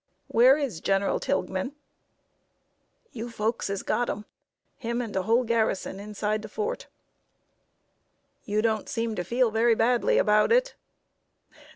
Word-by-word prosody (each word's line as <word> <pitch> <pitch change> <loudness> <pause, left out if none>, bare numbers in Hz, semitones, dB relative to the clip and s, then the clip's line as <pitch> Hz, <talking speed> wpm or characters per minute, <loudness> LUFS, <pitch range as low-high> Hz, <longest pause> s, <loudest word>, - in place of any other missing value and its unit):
"Where 255 +4 +6
is 265 - -3
General 195 0 +1
Tilghman?" 190 +6 -2 1.4
"You 235 +1 -6
folks 225 0 -2
has 195 -1 -3
got 245 - 0
him 210 +1 -4 0.5
him 235 -2 -3
and 230 -4 -4
de 190 - 0
whole 230 +6 +2
garrison 220 -4 -1
inside 210 +1 -2
de 215 - -8
fort." 435 - -4 1.6
"You 210 +1 -1
don't 220 -2 0
seem 230 -1 -2
to 180 - -2
feel 240 +3 +1
very 225 +1 +3
badly 235 +2 +2
about 210 - +3
it." - - +3
225 Hz, 135 wpm, -26 LUFS, 210-240 Hz, 1.6 s, Where